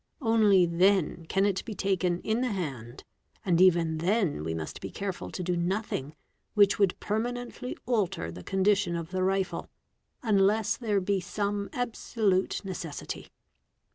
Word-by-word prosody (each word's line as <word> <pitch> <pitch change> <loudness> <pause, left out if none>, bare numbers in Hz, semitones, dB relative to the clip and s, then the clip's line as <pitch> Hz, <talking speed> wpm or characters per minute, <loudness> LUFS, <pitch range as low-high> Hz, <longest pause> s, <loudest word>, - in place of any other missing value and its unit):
Only 215 -5 +5
then 175 -1 +2
can 195 +3 +2
it 195 -2 0
be 220 - -6
taken 185 -3 0
in 220 +2 0
the 255 -2 0
hand, 130 - -5 0.4
and 175 -2 +3
even 165 -3 +4
then 180 - +1
we 80 +1 -2
must 80 -1 -6
be - - -5
careful 195 -2 -5
to 180 - -5
do 180 0 0
nothing 175 -5 -2 0.4
which 205 -1 +5
would 195 -3 +2
permanently 245 +3 -3
alter 200 - 0
the 90 +2 -9
condition 195 - +1
of 170 0 -5
the 185 -1 -1
rifle, 190 0 0 0.5
unless 210 -1 +3
there 215 -5 0
be 195 +1 +1
some 200 +2 -2
absolute 220 -6 0
necessity. 175 -5 -6
195 Hz, 145 wpm, -28 LUFS, 170-210 Hz, 0.5 s, Only